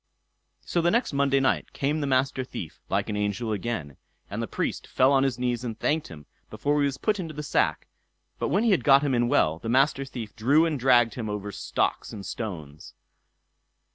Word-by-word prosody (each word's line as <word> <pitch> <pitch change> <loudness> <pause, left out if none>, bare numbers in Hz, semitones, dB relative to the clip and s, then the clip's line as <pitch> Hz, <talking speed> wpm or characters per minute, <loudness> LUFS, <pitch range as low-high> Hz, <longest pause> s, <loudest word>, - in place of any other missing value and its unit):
So 170 - 0
the 170 - +3
next 235 - +1
Monday 140 0 +2
night 135 - 0
came 150 +3 -1
the 145 - -1
Master 130 0 +1
Thief 85 -10 -8
like - - 0
an 105 - -3
angel 105 +2 -1
again, 100 - -3 0.3
and - - -3
the - - -3
Priest - - -3
fell 130 +2 +3
on 135 - +4
his 135 -3 0
knees 125 -1 -1
and 115 -3 -4
thanked 155 +5 0
him 75 -3 -11 0.2
before 145 +7 0
he 145 - +3
was 135 -1 -4
put 210 +4 0
into 165 -4 -5
the 150 - -5
sack; 145 - 0 0.5
but - - 0
when 200 +5 +2
he 230 - +3
had 190 - +2
got 140 0 +6
him 125 -4 +2
well 80 -8 +2
in, - - -20
the 115 - -4
Master 135 +3 +3
Thief 120 -6 -8
drew 140 +8 +4
and 155 -4 -1
dragged 120 -3 +4
him 115 -4 -4
over 105 0 -4
stocks - - -2
and 100 -3 -8
stones. 80 -9 -7
130 Hz, 210 wpm, -26 LUFS, 110-145 Hz, 0.5 s, got